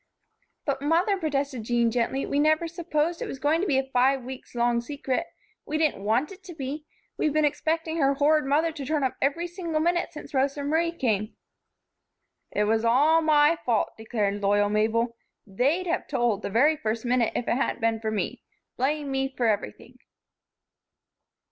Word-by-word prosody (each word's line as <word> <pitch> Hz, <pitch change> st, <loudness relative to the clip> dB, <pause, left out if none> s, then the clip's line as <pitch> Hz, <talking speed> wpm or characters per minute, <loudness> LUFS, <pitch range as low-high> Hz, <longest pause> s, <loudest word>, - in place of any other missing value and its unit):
"But, 275 Hz, -2 st, -1 dB
Mother," 335 Hz, +7 st, +2 dB
protested 280 Hz, -7 st, -2 dB
Jean, 235 Hz, 0 st, +1 dB
gently, 245 Hz, +3 st, 0 dB
"we 285 Hz, -, -1 dB
never 310 Hz, +2 st, +3 dB
supposed 335 Hz, 0 st, -2 dB
it -, -, -3 dB
was -, -, -6 dB
going 295 Hz, +5 st, +1 dB
to 400 Hz, -, -1 dB
be 275 Hz, -, +2 dB
a 265 Hz, -, +2 dB
five 260 Hz, +1 st, +3 dB
weeks 255 Hz, 0 st, -9 dB
long 240 Hz, 0 st, +2 dB
secret. 280 Hz, +5 st, -3 dB, 0.4 s
We 310 Hz, -, -2 dB
didn't 305 Hz, -11 st, 0 dB
want 230 Hz, -, +1 dB
it 385 Hz, 0 st, -12 dB
to 350 Hz, -3 st, -9 dB
be. 295 Hz, +2 st, -5 dB, 0.3 s
We've 305 Hz, -, +2 dB
been 310 Hz, 0 st, +3 dB
expecting 320 Hz, +2 st, -1 dB
her 275 Hz, -3 st, +2 dB
horrid 300 Hz, +1 st, +3 dB
mother 305 Hz, +4 st, +2 dB
to 305 Hz, -3 st, -7 dB
turn 295 Hz, +1 st, -1 dB
up 260 Hz, -, 0 dB
every 290 Hz, +5 st, 0 dB
single 345 Hz, -3 st, -3 dB
minute 345 Hz, +2 st, 0 dB
since 300 Hz, -2 st, -10 dB
Rosa 275 Hz, +1 st, 0 dB
Marie 325 Hz, +4 st, +1 dB
came." 220 Hz, -, -1 dB, 1.1 s
"It 210 Hz, -, 0 dB
was 220 Hz, +1 st, +1 dB
all 290 Hz, +8 st, +4 dB
my 310 Hz, +1 st, +4 dB
fault," 230 Hz, -4 st, +1 dB
declared 210 Hz, -2 st, -2 dB
loyal 205 Hz, +1 st, +2 dB
Mabel. 225 Hz, +3 st, +1 dB, 0.3 s
"They'd 270 Hz, -, 0 dB
have 345 Hz, +1 st, -2 dB
told, 240 Hz, -7 st, 0 dB
the -, -, -4 dB
very 275 Hz, +10 st, +4 dB
first 225 Hz, -3 st, -3 dB
minute, 245 Hz, -1 st, +1 dB
if 240 Hz, -, -2 dB
it -, -, +1 dB
hadn't 270 Hz, -, -1 dB
been 225 Hz, 0 st, +1 dB
for 220 Hz, 0 st, -2 dB
me. 215 Hz, -1 st, -3 dB, 0.4 s
Blame 285 Hz, +2 st, -1 dB
me 270 Hz, 0 st, 0 dB
for 245 Hz, -, +1 dB
everything." 205 Hz, -, -2 dB
275 Hz, 180 wpm, -26 LUFS, 235-315 Hz, 1.1 s, all